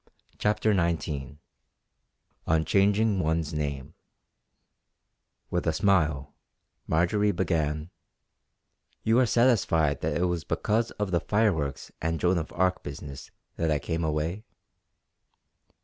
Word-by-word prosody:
CHAPTER 105 +1 +2
XIX 80 -7 -1 1.1
ON 80 0 +2
CHANGING 100 +4 +3
ONE'S 80 -2 0
NAME 70 -1 -3 1.6
With - - -1
a - - +4
smile 80 -8 +1 0.5
Marjory 95 +6 +2
began: 80 -3 -1 1.1
"You 115 +2 +3
are 130 - +4
satisfied 100 - +2
that 75 -1 -1
it 90 - +2
was 90 -2 -1
because 115 +2 0
of 105 -2 -2
the 85 - +2
fireworks 85 -11 0
and 80 0 -1
Joan 90 0 +2
of 80 - -6
Arc 95 +1 +1
business 70 -1 -8 0.3
that 80 - 0
I 75 - +2
came 80 +3 -3
away?" 80 +6 -2
85 Hz, 115 wpm, -27 LUFS, 75-100 Hz, 1.6 s, a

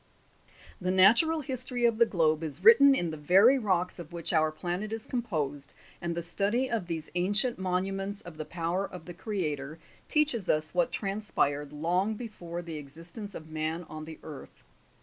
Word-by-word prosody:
7. 180 - -11
The 185 - +2
natural 305 - +6
history 255 -2 -1
of 230 -1 +2
the 235 - +6
globe 160 -4 +1
is 155 -3 -6
written 280 -12 +8
in 175 -8 -1
the 155 - -6
very 195 - +5
rocks 185 -5 0
of 170 -1 -9
which 170 0 -4
our 155 -1 +3
planet 180 +6 -4
is 225 +1 -4
composed, 155 - -3 0.3
and 170 -1 -2
the 170 - -2
study 210 +9 0
of 220 -7 -1
these 160 -2 -5
ancient 205 +7 +1
monuments 195 +2 -2
of 175 -3 -11
the 155 - -5
power 175 +3 -2
of 180 -3 -10
the 175 - -8
CREATOR 155 -7 -3 0.3
teaches 290 - +1
us 155 0 +1
what 175 -1 +2
tran 200 +1 -3
spired 145 -8 0
long 180 +8 0
before 175 -7 -7
the 165 -2 -6
existence 165 +8 -9
of 155 0 -9
man 160 +2 -2
on 155 0 -7
the 160 0 -9
earth. 150 -3 -11
180 Hz, 185 wpm, -29 LUFS, 160-215 Hz, 0.3 s, written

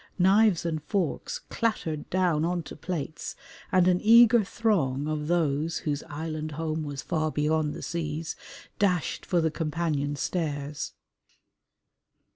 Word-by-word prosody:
Knives 195 -1 +4
and 160 -2 -1
forks 170 +2 -2
clattered 165 -10 -2
down 175 -4 +2
on 175 0 0
to - - -9
plates 155 -1 -4 0.4
and 185 -1 +4
an 180 0 +3
eager 235 +1 +7
throng 155 - 0
of 150 -1 -2
those 160 -2 +1
"whose 145 -2 -2
island 155 0 -4
home 160 0 -2
was 145 -2 -5
far 155 -2 0
beyond 150 0 0
the - - -7
seas" 160 -1 -3 0.4
dashed 180 -7 0
for 175 -3 +2
the 160 -1 +1
companion 150 -2 -1
stairs. 145 -2 -3
160 Hz, 130 wpm, -27 LUFS, 150-180 Hz, 0.4 s, eager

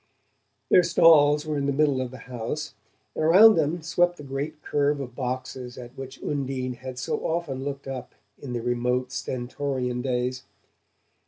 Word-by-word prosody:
Their - - +7
stalls 150 -3 +5
were 155 -2 -1
in 140 - -1
the - - +2
middle 140 -2 +2
of 130 - -3
the 130 - -10
house, 125 +5 -5 0.4
and - - -2
around 195 +8 +8
them 160 0 0
swept 175 +2 +1
the 150 - -10
great 140 +3 -4
curve 145 0 +1
of 125 -3 -6
boxes 125 -1 -4
at 125 0 -10
which 135 -1 -9
Undine 135 -3 -2
had 130 +1 -8
so 130 - -2
often 160 -6 -2
looked 140 -1 -5
up 130 -2 -6 0.2
in 130 -3 -6
the 120 -1 -3
remote 125 +1 0
Stentorian 125 -1 -3
days. 125 0 -1
135 Hz, 165 wpm, -26 LUFS, 125-150 Hz, 0.4 s, around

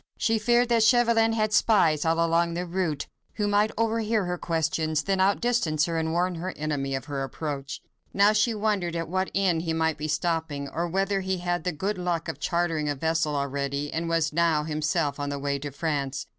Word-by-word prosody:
She 225 -1 +1
feared 240 +3 +3
that 235 -1 +3
Chauvelin 230 0 +4
had 215 -1 0
spies 165 -11 +3
all 165 +1 +2
along 170 0 +1
the 175 +1 -2
route, 170 -5 -2 0.3
who 210 -1 0
might 205 +1 +3
overhear 225 -2 +1
her 180 0 -2
questions, 160 -2 -1
then 195 -1 0
outdistance 195 -6 +2
her 165 -1 -1
and 160 0 -1
warn 180 +2 +1
her 185 +1 -4
enemy 145 -3 -2
of 135 - -5
her 145 -3 -4
approach. 140 +1 -5 0.3
Now 200 +2 +4
she 215 +2 +2
wondered 205 -5 -1
at 165 0 -2
what 185 +3 -1
inn 190 -4 +2
he 165 0 -2
might 160 -1 0
be 155 - -3
stopping, 155 -2 -1
or 170 +5 -2
whether 195 +3 0
he 190 0 -1
had 175 0 -3
had 175 -2 -1
the 180 - +1
good 190 +5 -3
luck 175 -2 -2
of - - -5
chartering 165 -3 0
a 145 - -1
vessel 160 +1 0
already, 140 +1 -2
and 165 +1 -2
was 165 -2 +1
now 165 -2 +2
himself 150 -2 -1
on 145 0 -2
the 145 - -3
way 140 0 -2
to 145 +1 -5
France. 140 -2 -2
165 Hz, 210 wpm, -26 LUFS, 150-195 Hz, 0.3 s, Chauvelin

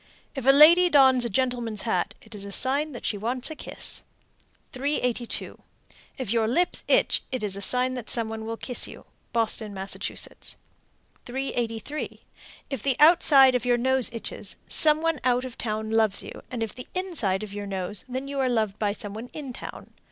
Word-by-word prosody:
If 270 -3 -5
a - - +10
lady 335 +6 +7
dons 265 -5 +5
a - - -1
gentleman's 235 -2 -1
hat, 185 -6 -1
it 220 - -14
is 205 -2 -6
a 200 - -7
sign 280 +8 +1
that 240 - -8
she 205 - -1
wants 245 +7 -1
a - - -5
kiss. - - -5 0.7
382. 250 -3 -2 0.6
If 240 -5 -2
your 225 -2 +2
lips 345 +10 +1
itch, - - +3
it 255 -3 -3
is 200 -2 -1
a 200 - -5
sign 250 +4 +3
some 230 -2 0
one 220 0 -5
will 225 0 -4
kiss 250 +1 +1
you. - - -12 0.3
Boston, 220 -3 -1
Mass. 190 +1 -5
383. 245 +1 -5 0.5
If 270 -5 -3
the 270 +1 +1
outside 295 -5 +7
of 250 -3 0
your 245 -1 +2
nose 260 0 +2
itches, 230 -1 -6
some 310 -1 +4
one 330 -3 0
out 250 0 +2
of 255 - -8
town 220 -1 -3
loves 220 -3 +2
you, - - -9
and 240 -3 -3
if 220 - -4
the 250 - -9
inside 260 - -1
of 205 -2 -8
your 205 0 -5
nose, 190 +1 -3
then 260 +2 -4
you 280 0 -4
are 260 -1 +2
loved 215 -4 0
by 205 -2 +1
some 205 -1 -7
one 225 +3 -7
in 275 -5 -6
town. - - -9
245 Hz, 190 wpm, -26 LUFS, 220-270 Hz, 0.7 s, a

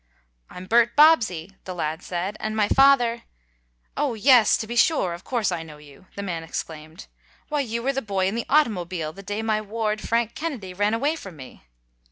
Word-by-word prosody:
"I'm 180 - -9
Bert 235 +3 +3
Bobbsey," 220 - +4
the 185 - -6
lad 160 0 -3
said, 185 +3 -4
"and 215 0 -3
my 210 -1 +3
father 245 -4 +4 0.4
" - - -44 0.3
"Oh, 280 -5 -1
yes, 240 -1 +5
to 220 - -4
be 235 +2 -6
sure! 235 - +2
Of 175 - -9
course 235 -6 -1
I 175 -2 -3
know 155 -2 -11
you!" 150 +4 -17
the 200 - -5
man 175 -4 -4
exclaimed. 160 +2 -7 0.4
"Why, 300 -1 -1
you 235 -3 -3
were 275 +2 0
the 270 - -2
boy 195 -4 -1
in 190 - 0
the 235 +1 -3
automobile 185 - 0
the 195 - -11
day 205 +3 -4
my 215 -1 0
ward, 215 0 -3
Frank 230 0 0
Kennedy, 260 - -5
ran 205 +4 +1
away 285 +7 0
from 195 - -10
me." 130 - -13
215 Hz, 205 wpm, -24 LUFS, 180-235 Hz, 0.4 s, yes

